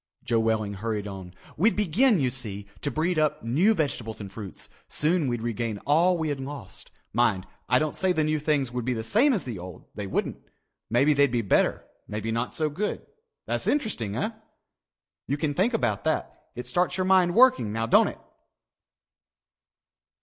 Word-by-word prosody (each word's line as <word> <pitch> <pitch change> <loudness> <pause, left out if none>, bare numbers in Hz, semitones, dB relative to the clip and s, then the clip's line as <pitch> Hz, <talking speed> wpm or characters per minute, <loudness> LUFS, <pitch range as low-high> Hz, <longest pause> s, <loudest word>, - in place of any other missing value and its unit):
Joe 115 - +1
Welling 110 -2 0
hurried 105 0 -3
on. 95 -2 -8 0.2
"We'd 210 +8 +3
begin, 210 - +3
you 130 -3 +1
see, 105 -6 -2 0.2
to - - -1
breed 160 +3 0
up 155 -1 0
new 165 - +3
vegetables 120 - -2
and 100 -2 -7
fruits. 100 -3 -8 0.2
Soon 160 0 +1
we'd 120 -2 -2
regain 115 -2 -2
all 170 +5 +4
we 160 -2 -1
had 145 -2 -2
lost. 135 -7 -8 0.2
Mind, 110 -5 +2 0.2
I 125 - +5
don't 155 +2 -1
say 190 -1 +1
the 160 -3 +1
new 155 0 +1
things 145 -4 0
would 125 0 -3
be 125 +2 0
the 110 - -3
same 235 - +3
as 215 -8 0
the 115 -7 -6
old. 90 -1 -10
They 100 -1 -5
wouldn't. - - -2 0.5
Maybe 135 +6 +4
they'd 140 -1 +4
be 120 -1 0
better, 100 - +2 0.2
maybe 105 +1 -3
not 115 +2 -1
so 155 - +1
good. 190 +8 -3 0.4
That's - - -2
interesting, 160 - 0
eh? 215 - -1 1.0
You 140 - 0
can 150 -1 -1
think 215 - +1
about 115 - 0
that. - - 0 0.2
It 125 - -6
starts 180 +1 0
your 185 - 0
mind 185 -2 +4
working, 250 - +5
now 115 +1 -1
don't 115 - +5
it?" - - -6
135 Hz, 185 wpm, -26 LUFS, 110-175 Hz, 1.0 s, I